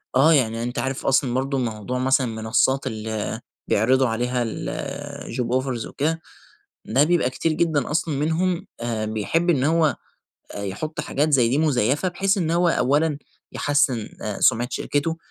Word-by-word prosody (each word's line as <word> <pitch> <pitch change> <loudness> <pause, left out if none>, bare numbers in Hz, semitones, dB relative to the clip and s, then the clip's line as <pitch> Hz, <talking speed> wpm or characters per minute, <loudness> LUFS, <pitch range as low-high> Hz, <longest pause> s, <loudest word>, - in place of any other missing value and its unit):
آه 145 +5 +6
يعني، 115 -5 +1
أنت 120 0 -3
عارف 135 +2 -3
أصلًا 135 -2 +2
برضه 135 +2 -1
موضوع 120 0 -3
مثلًا 130 0 +2
المنصات 115 +4 +1
اللي 110 -2 -4 0.3
بيعرضوا 130 +5 +3
عليها 120 +2 -1 0.9
الjob 120 -1 -2
offers 125 -4 -3
وكده، 160 +3 -1 0.6
ده 130 +6 +3
بيبقى 160 -5 +2
كتير 160 +5 -1
جدًا 155 -4 0
أصلًا 155 -1 0
منهم 165 +5 0 0.2
آآ 115 -2 -2
بيحب 110 - 0
إن 140 -6 +3
هو 160 0 +3 0.6
آآ 100 - -5
يحط 150 +11 -4
حاجات 150 +1 0
زي 125 -4 +5
دي 135 - +1
مزيفة، 145 - +2
بحيث 195 +3 0
إن 165 -3 0
هو 175 +1 +3
أوّلًا 145 +1 +2 0.3
يحسّن 145 -6 +1
آآ - - -4
سمعة 120 +2 +3
شركته، 145 +5 -1
135 Hz, 155 wpm, -23 LUFS, 120-155 Hz, 0.9 s, آه